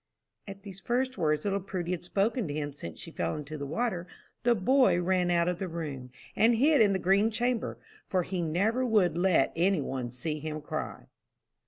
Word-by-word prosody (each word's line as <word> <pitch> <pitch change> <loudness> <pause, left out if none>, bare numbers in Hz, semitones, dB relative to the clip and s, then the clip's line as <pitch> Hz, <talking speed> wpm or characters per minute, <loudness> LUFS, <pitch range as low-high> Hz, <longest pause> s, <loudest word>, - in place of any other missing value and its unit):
At 195 0 -9
these 195 -2 -8
first 250 +2 -1
words 155 -1 +1
little 200 -1 +1
Prudy 180 -2 -4
had 180 -2 -3
spoken 205 +4 0
to 145 - -4
him 145 -1 -3
since 85 - -8
she - - -7
fell 85 -1 -2
into 150 +1 -6
the 140 -2 -5
water, 180 - -2 0.3
the 240 0 +3
boy 250 -1 +4
ran 180 0 +1
out 170 -1 +2
of 180 -1 -1
the 190 - -2
room, 150 -7 -5 0.3
and 225 +3 +4
hid 285 +3 +4
in 205 -2 +5
the - - +1
green 195 +4 +3
chamber, 240 +1 -1 0.3
for 185 -3 +1
he 185 0 -3
never 200 +10 +1
would 205 -9 +3
let 175 -5 +3
any 180 +2 +2
one 130 -3 -3
see 150 +5 -3
him 155 0 -4
cry. 150 - -5
180 Hz, 200 wpm, -29 LUFS, 155-215 Hz, 0.3 s, in